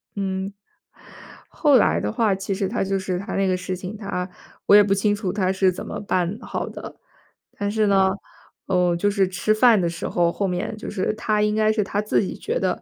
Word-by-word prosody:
嗯， 190 -1 -3 1.0
后 290 -4 +4
来 225 - +3
的 - - -2
话 220 -3 +1
其 195 +1 -3
实 195 0 -1
他 225 +3 -1
就 195 0 -1
是 185 -1 -2
他 200 - -5
那 195 0 +1
个 185 - +2
事 185 0 -4
情， 185 +3 -7
他 195 -3 -4 0.4
我 205 - +6
也 210 - +8
不 195 -1 +1
清 205 +1 +1
楚 200 -3 -3
他 190 -1 0
是 190 0 +2
怎 180 - -7
么 - - -5
办 185 0 -1
好 - - -4
的。 - - -9 0.6
但 205 0 -1
是 215 0 +1
呢， 195 -1 +4 0.6
嗯， 180 -2 +2
就 205 +4 +1
是 200 -2 +2
吃 190 +3 0
饭 225 -1 +5
的 175 - +1
时 165 0 -5
候 170 -1 +2
后 200 +3 -2
面 180 +4 -3
就 220 - -7
是 205 0 -1
他 215 -1 0
应 210 0 +1
该 215 0 +3
是 215 -1 +1
他 200 +1 -2
自 210 - +1
己 195 - -4
觉 470 +4 -3
得， - - -1
195 Hz, 245 characters per minute, -23 LUFS, 185-210 Hz, 1.0 s, 也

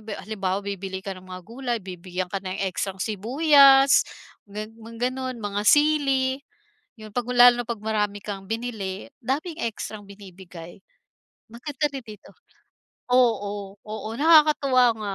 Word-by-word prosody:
'yong - - -19
ba 210 - -3
halimbawa, 195 -3 -2
bibili 195 -1 -5
ka 195 - -4
ng 185 - -13
mga 185 0 -8
gulay, 240 +2 -4
bibigyan 180 0 -6
ka - - -1
ng 190 0 -5
ekstrang 190 +1 -4
sibuyas, 270 - +5 0.4
ga 210 +1 -6
mga 230 +2 -3
gano'n 260 -1 -5
mga 205 -1 -3
sili, 275 -1 +3 0.6
'yon, 215 -2 -12
'pag 245 0 -2
lalo 245 0 +6
na 235 - -19
'pag 235 -3 -4
marami 210 -2 -1
kang 195 -2 -7
binili, 220 -4 -5
daming 310 +7 -3
ekstrang 215 -2 -5
binibigay. 185 -3 -12 0.7
Maganda 275 +5 -4
rin 270 - -5
dito, 210 -2 -13 0.8
oo, 205 -5 +1
oo, 215 0 -7
nakakatuwa 295 -4 +5
nga, 205 -2 -4
220 Hz, 145 wpm, -24 LUFS, 195-260 Hz, 0.8 s, lalo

